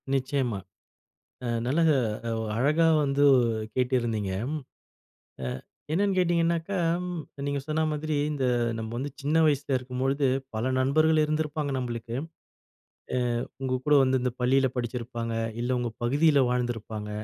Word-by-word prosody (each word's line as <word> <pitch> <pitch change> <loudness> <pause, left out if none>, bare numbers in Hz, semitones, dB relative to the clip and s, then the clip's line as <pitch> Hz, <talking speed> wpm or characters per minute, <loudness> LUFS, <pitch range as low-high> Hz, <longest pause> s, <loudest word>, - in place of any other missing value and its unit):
நிச்சயமா. 130 -5 0 0.9
அ - - -2 0.2
நல்லக 160 +5 +3 0.5
ஒ - - -2 0.2
அழகா 150 +7 +3 0.2
வந்து 140 +1 +2 0.5
கேட்டிருந்தீங்க. 120 -6 0 1.1
அ - - -2 0.5
என்னென்னு 195 +2 +2
கேட்டிங்கனாக்கா, 170 +1 +1 0.7
நீங்க 140 0 -1
சொன்ன 160 +1 +1
மாதிரி 155 0 -2 0.2
இந்த 140 -3 -1 0.3
நம்ம 110 0 -5
வந்து 140 +3 -3
சின்ன 150 +3 +1
வயசில 145 -2 +1
இருக்கும்பொழுது, 130 +2 -1 0.3
பல 120 +4 0
நண்பர்கள் 155 +4 +3
இருந்திருப்பாங்க 150 -1 -1
நம்மளுக்கு. 120 -2 -4 1.0
அ - - +2 0.4
உங்க 130 -1 -1
கூட 150 - +3
வந்து 130 -1 +2
இந்த 125 -2 0
பள்ளியில 130 +1 +3
படிச்சுருப்பாங்க, 120 -1 -3 0.3
இல்ல 125 +1 0
உங்க 120 -1 -2
பகுதியில 145 +4 +4
வாழ்ந்திருப்பாங்க. 115 -4 -3
135 Hz, 120 wpm, -27 LUFS, 120-150 Hz, 1.1 s, பகுதியில